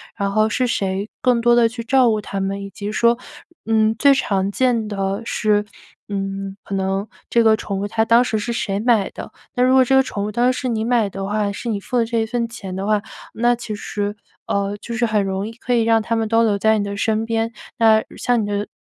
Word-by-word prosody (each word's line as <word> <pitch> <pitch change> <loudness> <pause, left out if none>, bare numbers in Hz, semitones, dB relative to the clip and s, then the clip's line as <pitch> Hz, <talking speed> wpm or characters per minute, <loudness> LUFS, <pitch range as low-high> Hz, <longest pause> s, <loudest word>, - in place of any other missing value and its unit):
然 200 0 -1
后 215 +1 +3
是 255 +3 0
谁 195 -2 -2
更 245 -2 +3
多 240 0 +4
地 235 -1 +5
去 230 0 -7
照 255 0 +4
顾 215 -1 0
它 195 - -5
们， 195 +1 -2
以 200 - -7
及 205 +1 -6
说 235 +2 +3 0.5
嗯， 220 0 +2
最 280 +3 +6
常 195 -6 0
见 235 -2 +1
的 195 +1 -2
是， 210 -2 +1 0.4
嗯， 195 -1 -4
可 200 - -4
能 195 +2 -1 0.2
这 235 -1 +3
个 220 -1 +5
宠 200 -2 -4
物 205 - -2
它 220 +1 0
当 235 +2 +5
时 220 -3 -1
是 235 +3 -3
谁 205 -4 -2
买 225 -5 +2
的？ - - -9 0.2
那 245 - +2
如 255 +1 +4
果 260 - +7
这 265 - +3
个 265 - +6
宠 205 -6 -4
物 210 - -3
当 240 +3 +2
时 - - -4
是 255 - -2
你 220 -1 -1
买 235 -4 +2
的 195 0 -5
话， 205 0 0
是 230 +4 -5
你 210 - -1
付 245 +5 -3
的 230 - +3
这 230 0 -1
一 220 - +1
份 235 0 -1
钱 195 -5 -7
的 195 +1 -3
话， 210 -1 +2 0.3
那 240 +1 +2
其 235 -2 -6
实， 205 0 -4 0.3
呃， 200 0 -1
就 235 +3 -7
是 240 -1 +1
很 210 -2 +1
容 195 +2 -2
易 225 - -8
可 245 +1 -3
以 235 - +3
让 225 0 +4
它 230 - -1
们 225 -1 0
都 230 +1 +3
留 210 -3 +2
在 220 +1 +3
你 205 - 0
的 200 0 -4
身 220 +1 0
边。 225 0 -1 0.3
那 220 -1 +5
像 245 -2 +1
你 - - -2
的， 205 0 -2
220 Hz, 270 characters per minute, -20 LUFS, 200-235 Hz, 0.5 s, 果